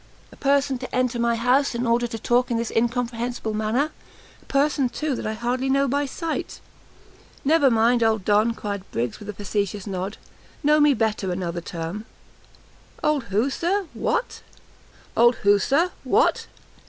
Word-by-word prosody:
a - - -14
person 275 -2 +1
to 255 - -6
enter 250 -1 0
my 235 0 +2
house 250 +3 +2
in 240 +1 -1
order 235 +1 +2
to 225 - -5
talk 245 +3 +1
in 235 - 0
this 230 0 -2
incomprehensible 235 -1 -1
manner! 220 +8 0 0.5
a - - -24
person, 275 -1 +1
too, 290 0 -2
I 215 - -2
hardly 250 +4 -1
know 275 +1 +3
by 285 +2 0
sight!" 330 +3 -4 0.9
"Never 295 -1 +5
mind, 235 +1 +3
old 220 -4 +2
Don," 215 +2 +3
cried 205 -3 -4
Briggs, 120 -1 -2
with 210 - -10
a - - -3
facetious 200 0 -3
nod, 195 0 -4 0.5
"Know 300 +1 +4
me 295 -2 +5
better 215 -4 -1
another 175 -1 -3
time!" 170 +6 -5 1.0
"Old 300 -5 +1
who, 220 +6 0
Sir! 380 +7 0
what!" - - -2
235 Hz, 145 wpm, -24 LUFS, 215-275 Hz, 1.0 s, Never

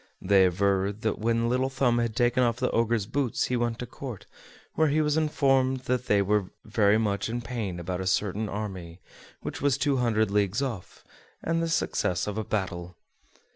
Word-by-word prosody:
They 95 0 +4
aver 95 +2 +1
that 110 +1 -3
when 115 +1 +1
Little 130 +2 +1
Thumb 130 -3 +1
had 115 -2 -1
taken 120 +1 +2
off 120 -2 +2
the 125 0 0
Ogre's 115 -2 +1
boots 125 +1 -1
he 125 - -1
went 120 -1 -1
to 125 - -5
Court, 125 -3 -8 0.5
where 160 - +3
he 150 +2 +2
was 150 -1 +2
informed 135 -4 +2
that 125 -1 -2
they 100 -1 +3
were 100 -1 +1 0.2
very 105 -2 +3
much 105 -1 -1
in 120 +1 -2
pain 110 -7 -4
about 90 +1 -3
a 95 - -3
certain 100 +3 0
army, 95 -5 -6 0.4
which - - -6
was 140 -1 +2
two 140 -1 +1
hundred 110 -4 +1
leagues 105 +1 +1
off, 115 -9 -6 0.4
and 165 0 0
the 165 - -1
success 95 - 0
of 105 +1 -3
a - - -1
battle. 90 -4 -3
115 Hz, 190 wpm, -27 LUFS, 100-125 Hz, 0.5 s, They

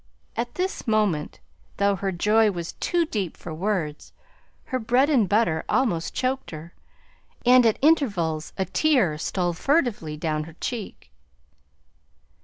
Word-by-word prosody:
At 240 +1 -3
this 370 -6 -3
moment, 210 -9 0 0.4
though 200 0 +2
her 195 +1 -2
joy 210 +5 +3
was 170 -4 -5
too 345 -1 0
deep 205 - -3
for 165 - -8
words, 165 -4 -3 0.5
her 255 - -3
bread 250 +6 +2
and 230 - +3
butter 190 -7 +2
almost 170 -11 0
choked 260 +1 -1
her, 160 +1 -9 0.7
and 250 -1 +7
at 220 - +2
intervals 200 - +2
a 190 - 0
tear 200 - +2
stole 175 +2 -1
furtively 210 - 0
down 155 -1 -2
her 160 -1 -13
cheek. 215 - -6
200 Hz, 135 wpm, -24 LUFS, 165-245 Hz, 0.7 s, and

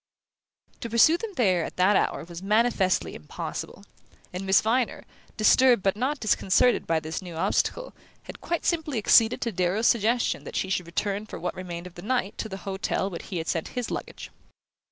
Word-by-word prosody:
To 235 - -5
pursue 235 +8 +5
them 425 +3 -5
there 185 - +2
at - - -6
that 185 +3 +4
hour - - 0
was 170 +1 -9
manifestly 210 -2 +1
impossible, 75 0 -7 0.5
and 185 +2 -5
Miss 190 -1 +6
Viner, 235 +3 0 0.3
disturbed 240 0 +5
but 195 0 +2
not 265 +6 -1
disconcerted 215 +2 +2
by 165 -1 +2
this 160 +3 -5
new 175 -3 -9
obstacle, - - -1 0.3
had - - -11
quite 340 -1 -3
simply 315 -6 0
acceded 225 +1 +4
to 235 - -1
Darrow's 185 +4 0
suggestion 235 +1 +2
that - - -9
she 190 - -1
should 180 -3 -1
return 200 +4 -2
for - - -7
what 180 - -3
remained 175 -1 -7
of 180 - -10
the 175 - -10
night 225 -1 -1
to 220 - -4
the 190 - -6
hotel 195 0 -2
where 170 - -5
he 185 - -6
had 165 0 -4
sent 165 - -1
his 245 - -2
luggage. - - -6
200 Hz, 190 wpm, -26 LUFS, 180-235 Hz, 0.5 s, Miss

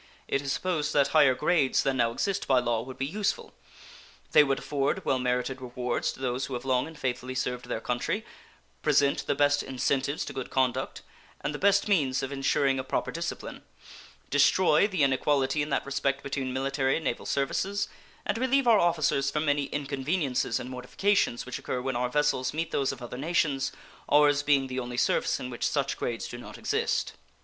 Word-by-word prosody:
It 135 - 0
is 140 -1 -3
supposed 155 -3 -1
that 140 -1 +3
higher 145 -5 +5
grades 150 -1 +2
than 135 -1 0
now 120 -2 +3
exist 195 +11 -2
by 130 - +4
law 120 -2 +1
would 130 +2 -9
be 135 - -1
useful. 200 +8 -2 0.8
They 150 - +7
would 135 -1 0
afford 145 +6 -1
well 130 - +1
merited 125 +1 -1
rewards 125 -1 -2
to - - -14
those 130 0 -2
who 130 - -4
have 120 +1 -6
long 130 +1 +1
and 160 -1 -11
faithfully 130 -1 -3
served 125 -1 -2
their 120 - -2
country, 155 - -2 0.6
present 140 -2 +2
the 145 - +1
best 145 0 +3
incentives 135 +2 -1
to 140 - -7
good 130 -2 -5
conduct, 130 -2 -1 0.4
and - - -2
the 145 - -5
best 200 +1 +3
means 140 -11 +2
of 135 - -3
insuring 135 0 +1
a - - -2
proper - - -2
discipline; - - -5 0.7
destroy 150 +5 +4
the 190 -8 0
inequality 135 +1 +2
in 145 - -2
that 140 - 0
respect 140 0 -1
between 135 -2 -3
military 135 +1 0
and 160 - -4
naval - - -2
services, 195 +9 -1 0.4
and 225 - -1
relieve 260 +1 +2
our 225 -3 +6
officers 155 -5 +2
from 150 +2 -1
many 145 -1 +1
inconveniences 140 +1 -1
and 125 - -7
mortifications 125 +3 0
which 125 - -5
occur 125 - -3
when 130 0 -2
our 125 +1 0
vessels 150 -2 +1
meet 165 +1 -2
those 135 -1 +1
of - - -9
other 120 +1 -7
nations, 145 -3 0 0.4
ours 145 -1 +5
being 145 -2 +3
the 130 0 -4
only 120 -1 -5
service - - +1
in 125 - -6
which 120 - -1
such 140 -2 -1
grades 115 -2 -3
do 120 - -8
not - - -10
exist. - - -1
135 Hz, 190 wpm, -28 LUFS, 130-150 Hz, 0.8 s, They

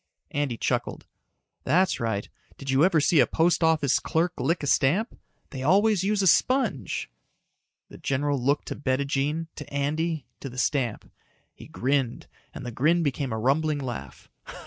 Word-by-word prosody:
Andy 145 -5 -1
chucked. - - -2 0.6
"That's 180 +7 +2
right. 110 -3 -2 0.3
Did 135 -1 -4
you 135 +3 +4
ever 175 -3 +4
see 155 +2 +3
a - - +5
post 165 +1 +2
office 155 -4 +3
clerk 170 +1 0
lick 165 +4 0
a - - -1
stamp? 165 - +2 0.4
They 130 - -6
always 195 +6 +3
use 200 0 +1
a - - +3
sponge." 220 - +1 0.8
The - - -13
general 140 0 -1
looked 140 +4 0
to - - -4
Bettijean, 140 +4 -1
to 150 - -9
Andy, 155 +3 -1
to 135 - -6
the 125 - -11
stamp. 130 -3 -1 0.4
He - - -13
grinned 130 -1 -1 0.3
and 135 - -9
the 120 - -4
grin 160 +9 +2
became 140 -3 -2
a 110 - -2
rumbling 145 +6 +1
laugh. 120 - -7
145 Hz, 160 wpm, -26 LUFS, 130-165 Hz, 0.8 s, a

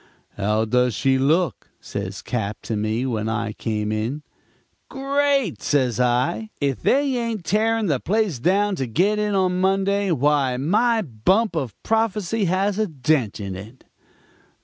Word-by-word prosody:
"'How 105 +2 0
does 125 +1 +1
she 135 +1 +2
look?' 160 +6 +1
says 100 -1 -6
Cap. 110 -4 -3
to 115 - -3
me 110 +4 -1
when 110 -4 -2
I 110 -1 -2
came 105 -2 -2
in. 115 +8 -2 0.7
"'Great,' 275 - 0
says 130 -5 +1
I. 125 - +1
'If 140 -3 -1
they 275 -1 +2
ain't 230 -6 -3
tearing 220 +5 +1
the 145 -8 +1
place 205 - 0
down 195 - +2
to 130 - -2
get 190 - +1
in 210 -1 0
on 185 -1 +1
Monday, 195 +1 +1
why 145 -4 +2
my 220 - +2
bump 170 - +1
of 130 -10 -3
prophecy 220 -2 0
has 190 +3 0
a 215 - +1
dent 135 - 0
in 100 -2 -5
it.' 110 +7 -11
155 Hz, 150 wpm, -22 LUFS, -, 0.7 s, she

